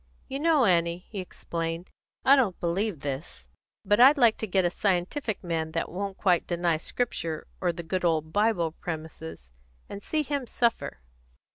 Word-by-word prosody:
"You 270 - -4
know, 310 -4 +4
Annie," 170 -1 +2
he 205 - -4
explained, 165 -1 -5 0.3
"I 275 - +8
don't 235 -10 +1
believe 175 -1 -1
this; 140 +2 -6 0.4
but 205 +1 +3
I 260 +3 +10
like 240 -6 +4
to 220 - -3
get 190 -1 +2
a 175 - +2
scientific 200 - -1
man 160 -2 -2
that 165 - -2
won't 195 +2 -4
quite 180 -3 +2
deny 170 -2 +1
Scripture 165 -4 -3 0.2
or 180 - +2
the 170 0 -7
good 180 +3 -2
old 160 -2 +1
Bible 205 -6 +2
premises, 160 - -7 0.4
and 200 - -7
see 310 +7 -1
him 285 -3 -3
suffer. 230 - 0
180 Hz, 165 wpm, -27 LUFS, 165-220 Hz, 0.4 s, I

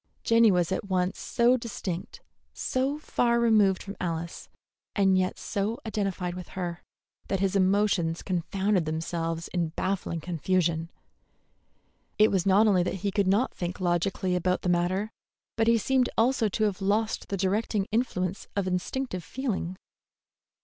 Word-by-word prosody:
Jenny 230 -1 +5
was 180 -2 +2
at 190 - -1
once 185 0 0
so 240 +2 +3
distinct, 200 -7 -5 0.3
so 265 +3 -1
far 235 -5 +1
removed 215 -5 +3
from 200 +1 -7
Alice, 170 -1 -4 0.5
and 195 -2 +4
yet 185 0 +1
so 210 +2 -2
identified 195 -4 -2
with 180 0 -7
her, 175 -2 -3 0.5
that 195 - -1
his 195 0 0
emotions 190 -3 +2
confounded 190 +1 0
themselves 165 +1 -3
in 175 -2 0
baffling 175 0 -2
confusion. 170 0 0 1.3
It 215 +1 +5
was 190 -1 +1
not 200 +3 +5
only 195 -4 +4
that 175 - -1
he 200 - +1
could 200 -1 +1
not 205 +7 +2
think 175 0 -4
logically 180 +1 0
about 180 +1 0
the 180 - 0
matter, 185 +5 +1 0.4
but 225 0 +1
he 230 0 +5
seemed 255 +3 +2
also 230 -1 +3
to 215 +3 -1
have 205 -2 0
lost 210 +3 0
the 195 - -2
directing 200 +2 0
influence 200 -5 -1
of 200 -2 0
instinctive 185 +2 -2
feeling. 200 -8 -3
190 Hz, 150 wpm, -27 LUFS, 180-215 Hz, 1.3 s, Jenny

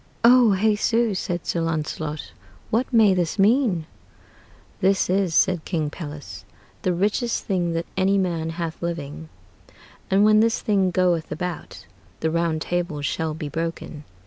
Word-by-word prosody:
"O 235 -3 +6
Jesu," 220 +2 +2
said 175 -2 -3
Sir 170 - -1
Launcelot, 155 -1 -3 0.4
"what 240 +5 0
may 220 -5 +5
this 175 -1 -1
meane?" 205 - +3 0.9
"This 190 -1 +2
is," 185 -4 +1
said 180 -4 +3
King 155 -5 -2
Pelles, 145 - -8 0.4
"the 185 - +1
richest 205 +7 0
thing 175 -4 0
that 165 0 -2
any 190 +1 +2
man 170 -4 -1
hath 165 -1 -5
living; 160 -2 -5 0.8
and 195 +2 +4
when 215 0 +5
this 225 +1 +2
thing 195 -3 +1
goeth 175 -2 +1
about, 180 0 -5 0.4
the 160 - 0
round 165 -1 0
table 175 -5 -2
shall 155 +1 -2
bee 155 -2 -5
broken. 165 -1 -5
175 Hz, 145 wpm, -23 LUFS, 160-200 Hz, 0.9 s, O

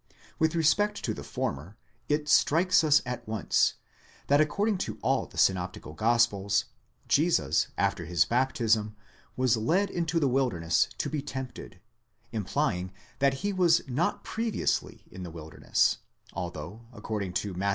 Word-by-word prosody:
With 160 +1 +2
respect 205 +6 +2
to 110 - -1
the - - -8
former, 80 +10 -4 0.3
it 150 0 0
strikes 165 +5 +4
us 150 -1 +4
at 125 -2 -5
once, 110 -1 +1 0.5
that 145 +1 +5
according 200 +6 +1
to - - -4
all - - +1
the - - -15
synoptical 90 -4 0
gospels, 110 -1 +2 0.4
Jesus - - +2
after - - 0
his 85 -3 +2
baptism 115 -4 +1 0.4
was 130 -2 +3
led 180 - +1
into 165 -1 0
the 145 - +2
wilderness 115 -12 +1
to - - -2
be 150 -2 -2
tempted, 130 -7 -7 0.5
implying 105 -3 -1 0.3
that 140 -1 +3
he 205 - 0
was 175 -4 +3
not 135 +7 -1
previously 225 -1 -2
in 95 - -9
the 90 - -6
wilderness, 80 -1 0 0.3
although, 90 +5 -6
according 105 -5 -4
to 100 +1 -2
Matt. 95 +3 -1
120 Hz, 140 wpm, -28 LUFS, 100-155 Hz, 0.5 s, that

